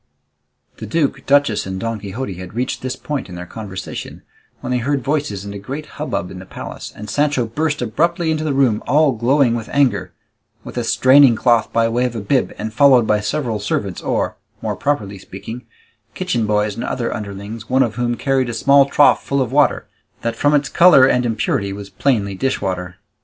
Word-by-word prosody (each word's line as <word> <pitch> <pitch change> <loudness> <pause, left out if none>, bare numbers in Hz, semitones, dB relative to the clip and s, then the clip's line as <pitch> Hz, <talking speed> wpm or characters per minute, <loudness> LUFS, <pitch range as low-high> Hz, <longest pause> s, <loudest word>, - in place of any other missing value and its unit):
The - - -7
duke, 160 -4 -1
duchess, 140 -8 +3
and 95 0 -4
Don 115 +1 -3
Quixote 100 +2 -5
had 90 +3 -9
reached 125 +2 -2
this 130 0 -3
point 145 -8 -4
in 90 - -8
their 90 0 -7
conversation, 95 0 -7 0.4
when 125 - -5
they 125 - +1
heard 140 +1 -1
voices 140 -9 -2
and 100 - -6
a 100 - -6
great 140 +9 -6 0.2
hubbub 90 - -3
in 95 - -8
the 95 - -10
palace, - - -8
and 105 - -8
Sancho 145 +2 +1
burst 145 +4 -2
abruptly 165 +8 0
into 155 0 -1
the 150 -3 -1
room 125 -6 +2
all 150 +1 +4
glowing 125 +2 +2
with 115 -2 -4
anger, 140 -3 +1 0.5
with - - -9
a - - -1
straining 130 -1 +5
cloth 120 0 +2
by 115 0 +2
way 120 +2 0
of 120 -1 -3
a - - -2
bib, 125 +6 0
and 110 0 -5
followed 130 -2 +5
by 105 -1 +2
several 110 +1 -2
servants, 100 -2 -2
or, - - -1 0.2
more - - -3
properly 105 -9 -2
speaking, 110 +6 -9 0.5
kitchen 125 -12 -1
boys 105 0 +1
and 115 - -5
other 120 -2 -2
underlings, 105 +1 -7
one 130 +1 +4
of 115 -4 -2
whom 120 0 -1
carried 135 -1 0
a 120 - -4
small 140 +3 +5
trough 145 +1 +4
full 140 - -1
of 125 -3 -1
water, 145 +1 +2 0.4
that 115 0 -1
from 145 +5 +2
its 145 -1 +1
colour 170 -6 +6
and 125 -2 +2
impurity 105 -3 -1
was 100 0 -8
plainly 105 -8 0
dishwater. 95 -5 -2
120 Hz, 200 wpm, -19 LUFS, 105-140 Hz, 0.5 s, colour